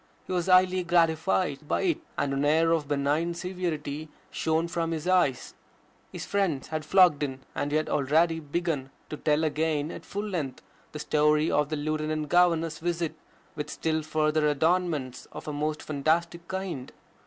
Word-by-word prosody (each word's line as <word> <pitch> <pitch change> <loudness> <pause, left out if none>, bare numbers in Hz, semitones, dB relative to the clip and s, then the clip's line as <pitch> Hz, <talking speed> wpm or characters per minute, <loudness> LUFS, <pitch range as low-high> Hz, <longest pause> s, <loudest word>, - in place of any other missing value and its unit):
He - - -4
was 175 -1 0
highly 185 0 +5
gratified 160 - +1
by - - 0
it, 340 -3 +1 0.2
and 140 - 0
an 135 +1 0
air 160 +3 +3
of 160 -3 +1
benign 150 +4 0
severity 160 -4 -4 0.2
shone 160 +1 0
from 170 -1 -2
his 165 0 -3
eyes. 180 -9 +2 0.6
His - - -6
friends 190 -9 -1
had 155 -1 -3
flocked 180 -2 +5
in, 135 -2 -3
and 145 - -2
he 150 - +2
had 155 - -1
already 160 +4 +2
begun 150 -3 -2 0.2
to 150 - -4
tell 150 +1 +1
again 155 0 0
at - - -8
full 205 +1 -4
length 155 -10 -4 0.3
the - - -6
story 150 +1 +2
of 150 -1 +2
the 155 - -1
Lieutenant 155 0 -2
Governor's 165 -2 +3
visit 170 -1 -1 0.4
with 150 - -4
still 160 -1 -1
further 155 0 +1
adornments 155 -3 0
of - - -8
a 150 - -3
most 150 +1 -2
fantastic 170 +4 0
kind. 190 -9 -4
155 Hz, 165 wpm, -27 LUFS, 150-170 Hz, 0.6 s, highly